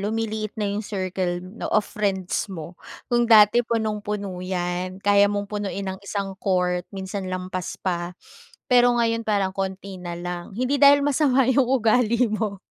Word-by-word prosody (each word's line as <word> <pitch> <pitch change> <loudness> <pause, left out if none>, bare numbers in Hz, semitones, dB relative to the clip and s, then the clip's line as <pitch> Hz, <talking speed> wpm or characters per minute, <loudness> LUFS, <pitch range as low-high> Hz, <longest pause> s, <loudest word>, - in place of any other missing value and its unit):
lumiliit 215 0 -2
na 210 - 0
'yung 205 +2 -2
circle 185 -3 -2
na 190 +5 -7
of 215 -1 +2
friends 195 -2 -2
mo. 170 -1 -7 0.3
Kung 240 -1 +1
dati 220 +1 +7
punong-puno 210 -4 -3
'yan, 185 0 -3
kaya 200 0 +4
mong 205 0 -2
punuin 200 -1 -4
ng - - -12
isang 200 -1 -4
court, 180 -2 0
minsan 190 -1 -5
lampas 185 0 -4
pa. 175 -1 -3 0.5
Pero 245 -1 +5
ngayon 230 -1 +1
parang 200 -2 +1
konti 190 -1 -5
nalang 175 +1 -6
hindi 255 +3 0
dahil 285 0 +7
masama 275 -2 +3
'yung 260 -1 +3
ugali 240 -1 +3
mo 210 -2 -2
200 Hz, 150 wpm, -23 LUFS, 185-225 Hz, 0.5 s, dati